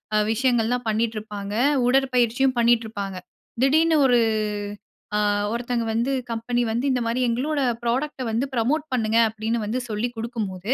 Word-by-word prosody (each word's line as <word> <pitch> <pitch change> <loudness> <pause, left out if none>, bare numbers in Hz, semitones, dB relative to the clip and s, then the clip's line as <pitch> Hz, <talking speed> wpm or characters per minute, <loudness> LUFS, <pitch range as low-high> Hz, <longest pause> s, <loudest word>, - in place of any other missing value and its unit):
அ - - +4
விஷயங்கள் 240 -1 +2
எல்லாம் 245 +1 -1
பண்ணிக்கிட்டு 220 +1 0
இருப்பாங்க. 205 -1 -7 0.3
உடற்பயிற்சியும் 255 0 +2
பண்ணிட்டு 235 -1 +3
இருப்பாங்க. 200 -3 -5 0.5
திடீரென்று 315 +4 +4
ஒரு 245 -2 +4 1.0
ஆ - - +2 0.3
ஒருத்தங்க 235 +1 -1 0.2
கம்பெனி 240 +2 -1
வந்து 235 +3 -1
இந்த 250 - 0
மாதிரி 235 +2 0
எங்களோட 280 +6 -1 0.2
ப்ராடக்ட 260 +4 -1
வந்து 230 +4 0
புரமோட் 260 +6 0
பண்ணுங்க 225 -2 +1
அப்பிடீன்னு, 220 +2 -2
வந்து 235 +5 -2
சொல்லி 215 +3 -1
குடுக்கும் 225 -2 -3
போது 185 +6 -3
235 Hz, 145 wpm, -23 LUFS, 220-255 Hz, 1.0 s, அ